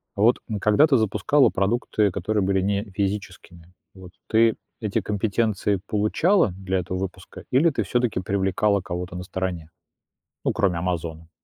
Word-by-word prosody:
Вот 110 +5 +4 0.2
когда 110 +9 +5
ты 135 -4 +4
запускала 110 +6 +3
продукты, 105 +1 +1
которые 100 +3 -1
были 95 0 +1
не 100 +1 0
физическими, 95 -3 -5 0.2
вот 95 -2 -13 0.2
ты 115 0 +4 0.3
эти 105 -2 -1
компетенции 105 -1 0
получала 110 - +2
для 95 0 -2
этого 90 +1 -4
выпуска, 95 0 -7
или 150 +7 +4
ты 140 - -1
всё-таки 120 -5 0
привлекала 100 +1 +1
кого-то 90 0 -5
на 90 - -5
стороне, 90 -4 -4 0.7
ну, - - +1
кроме 90 -4 +1
"Амазона"? 85 -2 -4
100 Hz, 140 wpm, -24 LUFS, 90-110 Hz, 0.7 s, когда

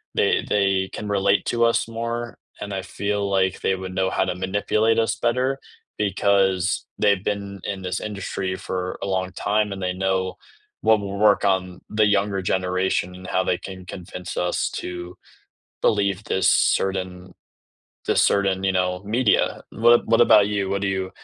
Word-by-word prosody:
they - - +2
they 95 -2 +1
can 105 - -5
relate 100 0 +2
to 120 -1 +1
us 115 0 +2
more 115 +1 -4 0.2
and 105 - -5
I 95 -1 -3
feel 100 +1 -2
like 95 -1 +1
they 95 - +1
would 95 0 -7
know 95 0 +1
how - - +1
to 90 - -2
manipulate 105 +4 +1
us 115 0 +1
better, 125 +4 0 0.4
because 100 -2 +1
they've 100 -2 +3
been 100 -2 -3
in 95 -2 -4
this 90 -1 -3
industry 95 -2 -4
for 90 -1 -4
a - - -3
long 95 -1 -1
time 105 +3 0
and 95 -1 -5
they 90 0 -1
know 95 0 -1 0.5
what 110 -1 +4
will 100 0 -5
work 105 -1 +4
on 95 -2 0
the 110 0 +3
younger 100 -1 +1
generation 90 -1 0
and 95 - -11
how 95 - +1
they 90 - 0
can 95 -1 -9
convince 90 0 -8
us 90 0 0
to 90 0 -6 0.6
believe 100 -2 +1
this 95 - +2
certain 95 -1 0 0.8
this - - +4
certain, 95 -1 +1
you 95 - +2
know, 90 0 0
media. 115 +3 +1
What 120 +1 +5
a - - -16
what 115 0 +3
about 105 -3 +6
you? 100 -2 -1
What 100 0 -1
do 100 - +1
you 95 -1 -2
95 Hz, 175 wpm, -23 LUFS, 95-105 Hz, 0.8 s, about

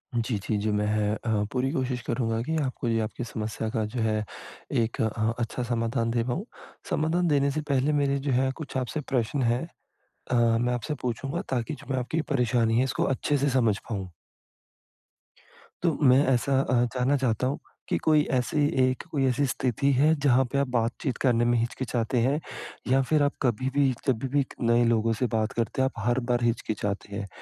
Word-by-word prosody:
जी, 115 -1 0
जी, 105 +2 -2
जी। 105 +1 -1
मैं 105 0 +1 0.3
अ, 110 -3 -1
पूरी 130 +1 0
कोशिश 130 -4 -2
करूँगा 115 -1 0
कि 160 +4 -2
आपको 130 -2 -3
ये 115 -1 +1
आपकी 110 +3 -4
समस्या 110 -1 -4
का 110 0 -1
जो 125 - -2
है, 110 -1 +1 0.5
एक 115 -1 0
अ, 110 0 0
अच्छा 120 +1 -2
समाधान 115 0 -1
दे 115 -1 +1
पाऊँ। 145 - -3 0.4
समाधान 170 +3 +1
देने 140 -2 +2
से 155 +2 -2
पहले 140 +2 +2
मेरे 140 0 +1
जो - - +2
है 130 +1 +2
कुछ 145 -4 -5
आपसे 130 +4 -2
प्रश्न 125 +3 +1
हैं 120 +4 +1 0.7
अ, 115 -2 +3
मैं 120 +1 +1
आपसे 125 +5 -3
पूछूँगा 135 - -2
ताकि 130 +3 -1
जो - - -11
मैं - - 0
आपकी 155 +6 -1
परेशानी 120 -3 +2
है, 130 - +4
इसको 135 - -1
अच्छे 145 +2 0
से 140 +1 +1
समझ 115 -6 +2
पाऊँ। 95 -4 -4 1.7
तो, 165 -5 +2
मैं 135 +1 +6
ऐसा 135 +1 +2
अ, 130 - -1 0.2
जानना 130 +3 +2
चाहता 130 -1 0
हूँ, 140 - -2 0.3
कि - - +2
कोई 155 -1 +3
ऐसी 135 +3 +1 0.2
एक 130 0 0
कोई 135 -3 +1
ऐसी 135 +3 +2
स्थिति 130 +1 0
है 150 +5 +4
जहाँ 130 -1 +5
पे 140 - 0
आप 140 -1 +2
बातचीत 120 +3 -1
करने 120 -3 +3
में 120 0 +3
हिचकिचाते 120 +1 -1
हैं 145 +4 +1 0.5
या 135 +1 +5
फिर 155 -2 +4
आप 145 - +2
कभी 130 0 +1
भी 140 -2 +4 0.2
जभी 130 +1 +1
भी 140 - +4
क - - -12
नए 120 +1 +4
लोगों 115 -1 +2
से 125 +3 -1
बात 110 -1 +1
करते 115 +3 -1
हैं, 130 - +3
आप 110 -2 -6
हर 120 +2 +2
बार 120 0 +2
हिचकिचाते 105 -3 -2
हैं? 100 -1 -4
125 Hz, 195 wpm, -27 LUFS, 115-135 Hz, 1.7 s, मैं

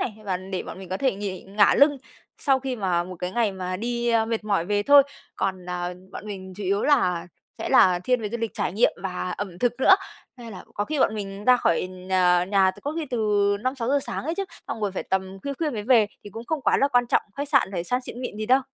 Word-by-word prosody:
này 215 - -2
và 185 -2 -1
để 185 0 -5
bọn - - -9
mình 190 -2 -10
có 190 - -2
thể 265 -3 +1
nghỉ 200 -2 -5
ngả 200 +2 +3
lưng 285 0 +5 0.4
sau 270 -2 +2
khi 260 -2 -3
mà 180 -4 0
một 185 0 -8
cái 180 0 -3
ngày 220 -2 +1
mà 185 -1 -4
đi, 240 +2 -2
a, 225 -1 +3
mệt 225 -1 -3
mỏi 200 -5 +1
về 205 0 +1
thôi. 285 +3 +8 0.3
Còn, 185 -2 -2
à, 180 0 -3 0.2
bọn 215 - -8
mình 190 -2 -7
chủ 205 - -6
yếu 200 +2 +1
là 180 - +2 0.3
sẽ - - -3
là 180 -1 +5
thiên 250 -2 +2
về 210 - -2
du 235 - -3
lịch 230 -1 -2
trải - - -1
nghiệm 220 +5 +3
và 180 -1 -3
ẩm 185 -3 -5
thực 245 -1 +2
nữa. 380 - +8 0.4
Nên 235 -2 -10
là 185 - -10
có 205 - -1
khi 305 +3 -3
bọn 220 - +3
mình 200 0 -6
ra 250 0 +6
khỏi 180 -5 +1
nh 185 0 -12 0.4
nhà 195 -2 +4
từ - - -14
có 290 - -2
khi 320 -3 -2
từ 240 - -1 0.4
5:00-6:00 255 +2 0
sáng - - -5
ấy 325 +2 -2
chứ, 395 - -2 0.2
xong 225 - -4
rồi 205 -2 -1
phải - - -3
tầm 190 0 -2
khuya 280 - -3
khuya 310 +1 -1
mới 215 -5 -4
về 230 -2 +5 0.2
thì 205 - -9
cũng 225 +3 -8
không 310 +2 -2
quá - - +3
là 275 - +3
quan 245 -2 +2
trọng - - +2
khách 285 0 -3
sạn 270 -9 +3
phải 175 -2 -3
sang 250 +6 0
xịn 250 -1 -8
mịn 245 -4 -5
gì 215 0 -4
đâu. 260 +2 +5
210 Hz, 265 wpm, -24 LUFS, 190-250 Hz, 0.4 s, thôi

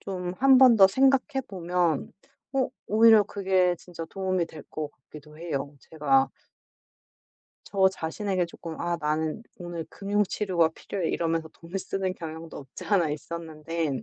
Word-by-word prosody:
좀 180 -2 -4
1 265 -1 +7
번 255 -3 +8
더 195 -2 +9
생각해 270 +5 +2
보면 175 -4 -1 0.4
어 265 -2 +1 0.2
오히려 220 0 +7
그게 190 -3 +1
진짜 170 -1 -8
도움이 185 -2 0
될 155 -2 -11
것 155 -1 -5
같기도 150 +2 -15
해요. 145 -4 -4
제가 135 -4 +2 1.4
저 190 -1 +4
자신에게 185 +1 -2
조금 165 -1 -8
"아 170 0 0
나는 155 +5 -1
오늘 175 -2 -6
금융 205 +1 0
치료가 185 -4 +1
필요해." 180 +1 -4
이러면서 165 -1 -1
돈을 175 +4 -7
쓰는 190 -1 -2
경향도 160 -1 -8
없지 135 -2 -10
않아 180 -7 +2
있었는데 160 -3 -4
175 Hz, 285 characters per minute, -27 LUFS, 160-195 Hz, 1.4 s, 더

